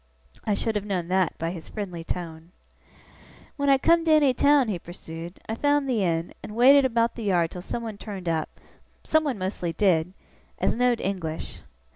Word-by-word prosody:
I 210 - +1
should 225 +2 -1
have 205 - -1
known 185 -4 -3
that 185 -3 +1
by 165 +1 -2
his 170 -3 -9
friendly 180 -6 -5
tone. 165 0 -6 1.0
'When 280 -1 0
I 275 - +6
come 335 +4 +3
to 320 - +3
any 295 -4 +5
town,' 280 0 +4
he 195 -5 -2
pursued, 170 0 -9
'I 220 - -2
found 290 +3 +1
the 235 -6 +1
inn, 165 -1 -1
and 210 - -8
waited 270 +4 +7
about 235 -2 +1
the 230 - -6
yard 175 -4 +2
till 180 - -7
someone 220 +2 -5
turned 195 -5 -7
up 160 -2 -2 0.4
(someone 310 -6 +1
mostly 185 -3 -3
did) 180 -2 +2 0.4
as - - +1
know'd 245 0 +1
English. 180 -5 -4
200 Hz, 180 wpm, -25 LUFS, 175-250 Hz, 1.0 s, waited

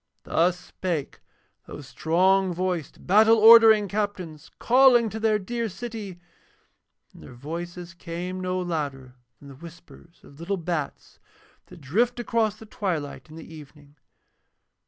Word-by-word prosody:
Thus 175 +2 +1
spake 170 -7 -5 0.5
those 145 -2 -10
strong 185 +6 +1
voiced, 180 -4 -4
battle 220 +4 +5
ordering 220 -1 +7
captains, 190 -7 -5
calling 245 -2 +4
to 220 - -6
their 215 -1 +2
dear 230 +3 -4
city, 210 -3 -8 0.9
and - - -16
their 125 - -13
voices 170 +6 -8
came 175 +2 -6
no 185 0 -2
louder 145 -7 -4 0.2
than 140 - -16
the - - -11
whispers 170 +2 -16
of 140 - -17
little 190 +4 -3
bats 165 -4 -5 0.5
that - - -15
drift 230 - 0
across 225 -2 -1
the 220 - -14
twilight 170 -10 -5
in 155 - -13
the 165 0 -12
evening. 145 -1 -15
180 Hz, 135 wpm, -24 LUFS, 160-215 Hz, 0.9 s, ordering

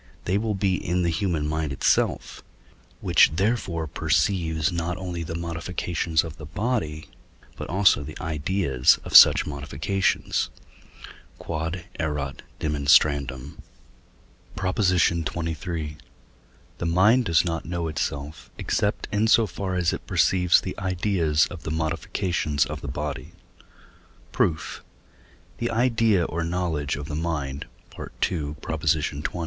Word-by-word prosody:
they 90 - 0
will 105 0 0
be 95 -2 0
in 90 +1 0
the 85 - +1
human 80 -4 -1
mind 80 -1 -2
itself, 70 - 0 0.6
which - - +5
therefore 95 -4 0
perceives 80 +1 0
not 85 +1 -2
only 90 -2 -5
the 85 0 -5
modifications 85 -1 -1
of 80 -2 -8
the 75 - -9
body, 90 -6 -2 0.5
but - - -7
also 95 -4 +4
the 75 +2 -8
ideas 80 -4 +2
of - - -4
such - - +9
modifications. 75 +7 -1 0.9
Q.E.D. 80 +2 -4 0.2
PROP. 75 -4 -3 2.4
XXIII. 85 -3 0 0.8
The - - -2
mind 105 +9 +4
does 85 -2 +3
not 85 -1 -3
know 85 -1 -3
itself, 70 -3 -4
except 105 - -1
in 105 +2 +2
so 115 0 +5
far 95 0 -4
as 90 -2 +1
it - - -7
perceives 90 -2 +3
the 95 - -5
ideas 90 -5 +1
of 90 - -8
the - - -6
modifications 80 -1 -1
of - - -6
the - - -7
body. 70 -1 -5 1.0
Proof. 80 -2 -1 0.8
The 120 - -1
idea 115 -5 +2
or 85 +1 -3
knowledge 85 -4 -1
of 70 +1 -6
the 75 - -6
mind 75 -5 -3 0.3
(II. - - -7
xx.) 75 -2 -2
85 Hz, 120 wpm, -25 LUFS, 75-95 Hz, 2.4 s, such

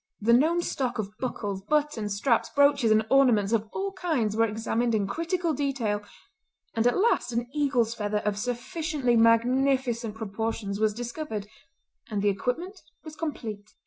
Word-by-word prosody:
The 230 +3 +3
known 325 +8 +3
stock 255 -7 -2
of 210 -1 -4
buckles, 205 -6 -3
buttons, 285 -5 0
straps, 235 +2 +2
brooches 280 -4 +3
and 215 0 +4
ornaments 235 -6 +4
of 220 -1 0
all 395 0 -3
kinds 310 - -1
were 225 +1 +3
examined 225 +2 -1
in 205 -2 +1
critical 335 - -1
detail; 255 -7 -1 0.7
and 225 +1 +2
at 245 - +2
last 380 - +2
an 235 +1 -1
eagle's 265 -6 +1
feather 210 -2 -2
of 210 -1 +1
sufficiently 250 +3 -1
magnificent 235 0 +2
proportions 220 -1 -3
was 215 -1 +1
discovered, 240 -2 -5 0.6
and 205 -2 -2
the 205 - +4
equipment 330 - -3 0.2
was 310 -1 -9
complete. 220 -11 -6
235 Hz, 150 wpm, -27 LUFS, 215-285 Hz, 0.7 s, and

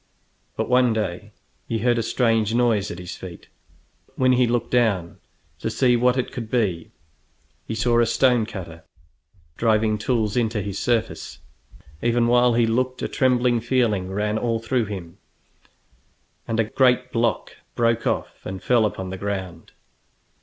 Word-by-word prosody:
But - - -1
one 125 -2 +3
day 105 -1 -3 0.4
he 115 - -1
heard 120 +1 +1
a - - +1
strange 115 -1 +1
noise 115 -5 +2
at - - -6
his 90 0 -7
feet, 90 -3 -11 0.6
and - - -31
when 130 0 +3
he 125 -1 +3
looked 120 0 -1
down 105 -9 +1 0.4
to - - -2
see 125 +2 +2
what 125 +2 +2
it 125 - -2
could 115 -3 -6
be, 100 -10 -1 0.8
he 110 - -3
saw 120 +1 +2
a 120 - +3
stone 120 -1 +2
cutter 85 -5 -8 0.7
driving 110 -2 +2
tools 110 -1 0
into 115 -3 0
his 100 -1 -4
surface. 115 -2 -2 0.6
Even 120 0 +2
while 120 0 +4
he 120 -1 +3
looked 125 +3 -1
a - - 0
trembling 125 -2 +2
feeling 115 -6 0
ran 105 +2 -1
all 115 -1 0
through 115 +1 -1
him, 95 -4 -8 1.3
and 115 0 -1
a - - +4
great 125 +3 +2
block 115 -3 -1 0.2
broke 115 -1 +1
off - - -3
and 95 0 -7
fell 120 -3 +3
upon 95 -2 -6
the 95 - -6
ground. 95 -4 -5
115 Hz, 160 wpm, -23 LUFS, 105-120 Hz, 1.3 s, while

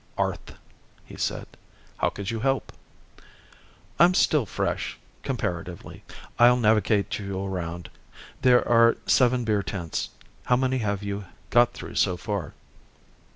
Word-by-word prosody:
"Arth," - - -3 0.5
he - - -12
said. - - -2 0.5
"How - - +1
could 100 0 -5
you 115 - -3
help?" 135 +3 -1 1.3
"I'm 175 +2 +6
still 145 - +3
fresh - - -2 0.2
comparatively. 85 0 -5 0.4
I'll 120 +1 +7
navigate 105 -3 +2
you 100 -1 -4
around. 85 -2 -4 0.5
There 125 -1 +4
are 115 0 +5
seven 125 -1 +3
beer 105 -3 +1
tents. 90 -5 -4 0.4
How 125 - +3
many 130 +1 0
have 100 -3 -2
you 100 0 -4 0.3
got 120 0 +4
through, - - -9
so 90 - +2
far?" 100 -6 -4
105 Hz, 125 wpm, -25 LUFS, 95-125 Hz, 1.3 s, I'll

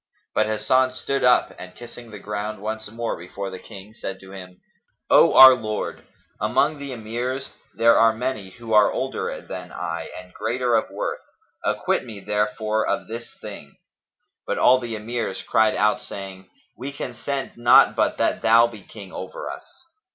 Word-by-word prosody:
But 110 - +2
Hasan 130 +4 +2
stood 135 +2 -2
up 125 0 +4
and, 90 0 -10
kissing 120 0 -11
the 105 - -9
ground 105 +1 -5
once 110 +1 -5
more 115 +1 -3
before 95 +3 -7
the 95 - -7
King, 100 +2 -12
said 95 -4 -6
to 95 0 -13
him, 90 -2 -11 0.5
"O - - +6
our 130 0 +11
lord 110 -4 -3
the - - -20
King, - - -31 0.3
among 155 -2 +1
the 140 -1 -6
Emirs 125 +3 -4 0.2
there 115 +1 +5 0.2
be 110 - -10
many 120 -6 -3
who 115 +3 -7
are 105 -1 +6
older - - -3
than - - -8
I 85 0 -5
and 90 0 -14
greater 120 +3 -1
of 110 - +1
worth; - - -4 0.4
acquit - - 0
me 105 -3 -9
therefore 105 +1 -1
of - - -1
this 115 +1 -7
thing." 100 -9 -10 0.7
But - - -1
all 130 +1 +5
the 120 -3 -5
Emirs 110 -2 -4
cried 110 -1 +3
out 105 0 +2
saying, 95 -1 -9 0.3
"We 135 +4 -6
consent 135 +1 -4
not 120 +1 +6
but - - +1
that - - 0
thou 115 +1 +6
be 115 -3 -7
King 100 -1 -12
over - - -6
us." - - -13
110 Hz, 175 wpm, -23 LUFS, 100-120 Hz, 0.7 s, our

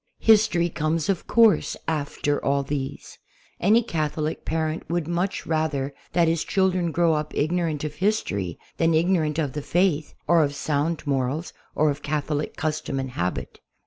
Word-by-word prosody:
History 210 -6 +5
comes, 160 +1 -1
of 190 -4 -1
course, 230 -3 +4
after 145 -2 -1
all 140 0 +1
these. 135 -1 -5 0.4
Any 220 +6 +4
Catholic 155 -5 -2
parent 160 0 -2
would 170 -2 -1
much 175 +3 -1
rather 155 -4 -1 0.2
that 170 -1 +4
his 165 0 +1
children 185 -3 +1
grow 170 0 +3
up 150 0 -3
ig 155 +3 +1
norant 165 -5 -1
of 150 -1 -3
history 130 - -1 0.2
than 165 -1 +3
ignorant 160 -2 +2
of 145 -5 -1
the 150 - -3
Faith 170 -1 +1
or 170 -1 +5
of 145 -1 -1
sound 150 +3 -1
morals, 140 +4 -1 0.2
or 155 0 +3
of 145 +1 -6
Catholic 150 0 -2
custom 155 -4 -2
and 130 -1 -4
habit. 90 -7 -3
155 Hz, 160 wpm, -24 LUFS, 145-170 Hz, 0.4 s, History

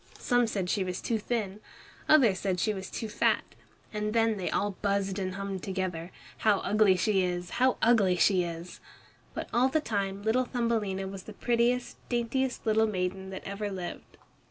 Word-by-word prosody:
Some 245 -2 +2
said 195 -4 -2
she 195 +1 +1
was 180 -1 -3
too 225 -2 -1
thin, 210 -3 -2 0.5
others 235 -12 +5
that 185 -2 0
she 215 +4 +1
was 190 -1 -6
too 225 - -4
fat, 210 - +2 0.5
and 210 0 -2
then 225 -2 +2
they 185 - -2
all 205 - 0
buzzed 200 -1 0
and 185 -1 -3
hummed 195 -1 -4
together, 185 -3 -3 0.3
"How 210 -2 +4
ugly 210 -3 +4
she 195 +1 +2
is, 180 -1 -2
how 260 0 +4
ugly 215 -6 +5
she 180 0 +4
is!" 170 +1 -7 0.6
But - - -4
all 250 +2 +4
the 315 - +2
time 200 -7 -2
little 240 +4 +2
Thumbelina 220 -6 -1
was 190 -1 -8
the 215 - -9
prettiest, 240 +3 +1
daintiest 245 +2 -1
little 220 0 +3
maiden 190 -1 -2
that 190 - -7
ever 200 +1 -3
lived. 185 -3 -7
200 Hz, 180 wpm, -29 LUFS, 190-230 Hz, 0.6 s, others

